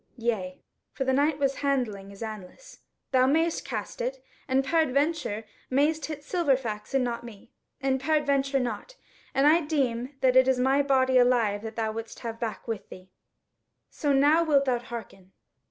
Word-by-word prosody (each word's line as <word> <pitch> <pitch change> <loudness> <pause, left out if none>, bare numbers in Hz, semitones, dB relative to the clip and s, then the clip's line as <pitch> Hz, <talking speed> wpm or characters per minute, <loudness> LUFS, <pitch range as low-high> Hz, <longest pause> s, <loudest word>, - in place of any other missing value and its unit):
Yea," 215 -6 -2 0.3
(for 270 - -2
the 265 0 +1
Knight 285 +2 +2
was 275 -2 0
handling 245 -9 -1
his 200 +2 -9
anlace) 220 - -9 0.3
"thou 255 -1 +4
mayst 325 +4 +1
cast - - -5
it, - - -2 0.3
and 265 0 +1
peradventure 290 -7 0 0.2
mayst 295 +3 +1
hit 300 -2 -6
Silverfax 270 - -1
and 265 - +3
not 235 -1 -3
me, 220 -4 -12 0.3
and 265 -2 0
peradventure 280 -2 +1
not; 245 - -4 0.4
and 270 - +3
I 320 +3 +6
deem 270 -4 -1
that 255 -1 +3
it 260 0 +6
is 260 -1 +3
my 265 +3 +3
body 260 -2 +3
alive 235 -5 +3
that 220 0 -7
thou 220 -1 -1
wouldest 225 +1 -7
have 230 -1 -5
back 220 -3 -4
with 225 -3 -5
thee. 185 0 -13 0.8
So 290 - -1
now, 290 +4 +4
wilt 285 -4 +3
thou 250 -2 +1
hearken?" 225 -6 -9
260 Hz, 170 wpm, -27 LUFS, 230-285 Hz, 0.8 s, I